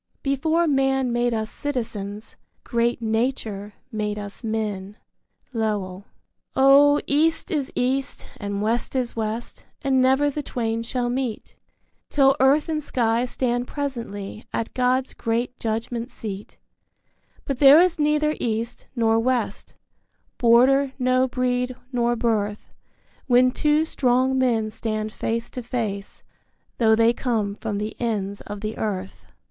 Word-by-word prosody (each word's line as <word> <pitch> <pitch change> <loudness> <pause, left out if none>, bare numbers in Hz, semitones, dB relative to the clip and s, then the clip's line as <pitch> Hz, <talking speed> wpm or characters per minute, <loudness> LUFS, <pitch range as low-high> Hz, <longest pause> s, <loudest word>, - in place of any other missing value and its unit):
Before 315 +5 +1
man 270 -3 +2
made 240 0 +1
us 220 -1 -2
citizens, 220 -7 -5 0.3
great 235 -1 0
Nature 220 -3 -2 0.2
made 210 -2 -2
us 205 +3 -8
men 210 -2 -3 0.6
Lowell. 205 -4 -2 0.5
Oh, 280 +2 +6
East 320 +6 +1
is 290 -5 -1
East, 260 +2 -1
and 205 -1 -3
West 230 +4 -1
is 250 -2 -1
West, 225 +1 -4 0.2
and 265 -2 +3
never 265 +3 +3
the 295 - -3
twain 230 -4 -2
shall 240 +1 -2
meet 245 -2 -3 0.5
Till 270 -2 +4
earth 275 +3 +4
and 310 -1 -1
sky 235 -3 +1
stand 245 -1 -1
presently 230 -8 -5
at 230 - -3
God's 255 +1 +1
great 235 +2 -2
judgment 230 +2 -3
seat; 210 -4 -7 0.9
But 275 -4 -3
there 285 +2 +9
is 350 -2 +3
neither 300 0 +2
East, 230 +1 -3
nor 225 -2 +3
West, 235 -4 -1 0.6
border 260 +3 +5
nor 255 0 +2
breed 250 0 -1 0.2
nor 240 -1 +1
birth 215 -3 -1 0.5
When 250 0 +5
two 300 +3 +2
strong 260 -2 +2
men 225 -4 +1
stand 215 -1 -3
face 230 +1 -3
to 250 - -5
face, 220 -5 -4 0.6
tho' 220 -2 +5
they 230 +1 +4
come 225 -6 -1
from 210 0 -4
the 210 +1 -4
ends 205 -4 -2
of 205 -1 -7
the 215 0 -4
earth. 190 -3 -4
240 Hz, 130 wpm, -23 LUFS, 220-265 Hz, 0.9 s, there